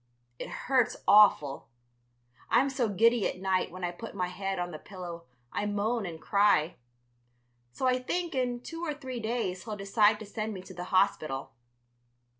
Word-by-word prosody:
It - - -5
hurts 250 -2 +1
awful. 175 -10 +5 0.8
I'm 275 +2 +3
so 255 -4 0
giddy 225 +2 +3
at - - -5
night 190 -1 +1
when 185 +1 -9
I 175 - 0
put 225 +6 -9
my 180 -2 -1
head 195 +1 -3
on 175 0 -3
the 155 - -7
pillow 175 -3 -8 0.3
I 205 - -1
moan 210 +1 -1
and 165 -2 -7
cry. 200 -4 +3 0.9
So 260 - -3
I 255 0 +3
think 345 +6 -2
in 250 -2 -1
two 330 +1 -7
or 305 -3 -2
three 260 -4 -6
days 220 -5 -2
he'll 215 -2 -5
decide 210 +2 +3
to 215 - -8
send 215 +1 -4
me 185 - -7
to 185 - -11
the 180 0 -6
hospital. 155 -8 +1
205 Hz, 175 wpm, -29 LUFS, 180-240 Hz, 0.9 s, awful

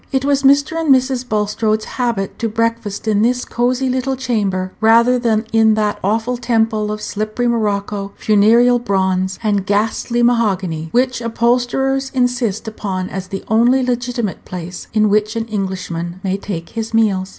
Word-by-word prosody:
It 265 0 0
was 280 -1 +2
Mr. 285 +4 +3
and 320 - -2
Mrs. 260 -1 +2
Bulstrode's 215 +1 0
habit 235 -6 -3
to 230 - -1
breakfast 230 -1 -2
in 210 -1 +2
this 245 +2 +1
cosy 250 +2 0
little 260 +1 -1
chamber 200 -8 -1
rather 235 +3 +5
than 225 -2 +1
in 220 -1 +4
that 210 -1 -1
awful 225 +5 0
temple 225 -3 0
of 210 0 -5
slippery 215 +3 -2
morocco, 205 -3 -1
funereal 230 +4 +4
bronze, 190 -3 0
and 205 -3 +1
ghastly 225 +4 0
mahogany, 190 -9 +1
which 250 0 +1
upholsterers 245 +3 0
insist 245 -4 0
upon 190 -4 -4
as 190 -1 -5
the 195 +1 -6
only 240 +4 +3
legitimate 240 -4 -2
place 180 0 -7
in 215 -1 +3
which 210 +2 +1
an 225 0 -2
Englishman 185 -4 -4
may 190 -1 0
take 195 -4 -6
his 225 0 -4
meals. 195 -4 +2
225 Hz, 155 wpm, -17 LUFS, 200-245 Hz, -, rather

